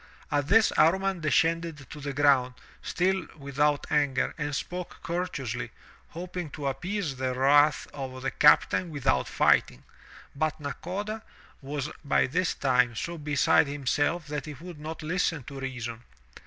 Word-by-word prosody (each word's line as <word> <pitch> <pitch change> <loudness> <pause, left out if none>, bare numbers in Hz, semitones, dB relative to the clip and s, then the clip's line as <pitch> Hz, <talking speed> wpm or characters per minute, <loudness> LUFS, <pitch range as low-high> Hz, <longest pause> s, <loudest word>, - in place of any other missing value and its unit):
At 145 -1 +1
this 220 +4 +5
Amman 190 +4 +3
descended 165 -1 0
to 150 - -8
the 140 -1 -4
ground, 135 -3 +3 0.3
still 190 +1 0
without 145 +1 0
anger, 140 -3 +1
and 150 -1 -3
spoke 180 +4 -5
courteously, 170 -8 -3 0.4
hoping 175 -1 -6
to 145 -2 -3
ap 135 0 -6
pease 180 -7 -2
the 130 -1 -1
wrath 145 +3 +4
of 130 -2 -6
the 135 - -1
captain 150 +3 +4
without 135 - 0
fighting. - - +2 0.5
But 155 +2 -1
Nakoda 190 - -4 0.4
was 145 +1 -4
by 140 - +3
this 180 +7 0
time 125 -3 +2
so 170 +8 -4
beside 145 0 +3
himself 145 +4 0
that 150 0 -5
he 150 - -6
would 170 +2 -10
not 155 +1 -6
listen 165 -3 0
to 135 +2 -8
reason. 120 -3 -5
150 Hz, 145 wpm, -28 LUFS, 135-170 Hz, 0.5 s, this